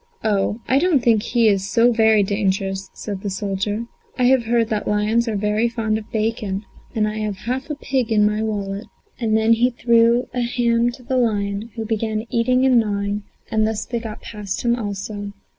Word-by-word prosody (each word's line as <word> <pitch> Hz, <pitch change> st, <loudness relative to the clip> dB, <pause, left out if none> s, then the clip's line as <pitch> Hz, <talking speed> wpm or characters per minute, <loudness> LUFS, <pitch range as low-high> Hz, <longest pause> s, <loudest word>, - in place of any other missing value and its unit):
"Oh, 205 Hz, 0 st, +1 dB
I 265 Hz, -, +4 dB
don't 325 Hz, -5 st, +3 dB
think 225 Hz, -3 st, +4 dB
he 235 Hz, 0 st, +2 dB
is 195 Hz, -2 st, +1 dB
so 235 Hz, +2 st, +4 dB
very 220 Hz, -2 st, +4 dB
dangerous," 195 Hz, -1 st, -1 dB
said 200 Hz, -3 st, -6 dB
the 205 Hz, -, -3 dB
soldier; 200 Hz, +3 st, -2 dB, 0.3 s
"I 255 Hz, -, +1 dB
have 250 Hz, -1 st, +4 dB
heard 230 Hz, -1 st, +2 dB
that 215 Hz, -1 st, -2 dB
lions 215 Hz, +3 st, +1 dB
are 220 Hz, -, -1 dB
very 210 Hz, +3 st, +1 dB
fond 220 Hz, -2 st, -1 dB
of 215 Hz, -, -14 dB
bacon, 215 Hz, -2 st, -2 dB, 0.3 s
and 215 Hz, -1 st, +2 dB
I 215 Hz, +1 st, -3 dB
have 210 Hz, -2 st, -2 dB
half 260 Hz, +5 st, -2 dB
a 300 Hz, -, -2 dB
pig 260 Hz, -5 st, -1 dB
in 210 Hz, -1 st, +4 dB
my 210 Hz, +1 st, +1 dB
wallet;" 205 Hz, -1 st, -3 dB, 0.3 s
and 220 Hz, -2 st, +2 dB
then 220 Hz, +1 st, +4 dB
he 240 Hz, +2 st, +3 dB
threw 235 Hz, 0 st, +3 dB
a 250 Hz, -, -1 dB
ham 235 Hz, 0 st, +1 dB
to 250 Hz, 0 st, -13 dB
the 260 Hz, +2 st, -1 dB
lion, 205 Hz, -2 st, 0 dB
who 225 Hz, -1 st, -4 dB
began 220 Hz, 0 st, -2 dB
eating 255 Hz, +2 st, +2 dB
and 255 Hz, -2 st, +5 dB
gnawing, 205 Hz, -1 st, -1 dB, 0.3 s
and 215 Hz, -1 st, +2 dB
thus 220 Hz, -1 st, -2 dB
they 235 Hz, -, -3 dB
got 225 Hz, -2 st, -7 dB
past 205 Hz, -3 st, -5 dB
him 235 Hz, 0 st, +3 dB
also. 205 Hz, -2 st, -5 dB
220 Hz, 200 wpm, -21 LUFS, 205-235 Hz, 0.3 s, and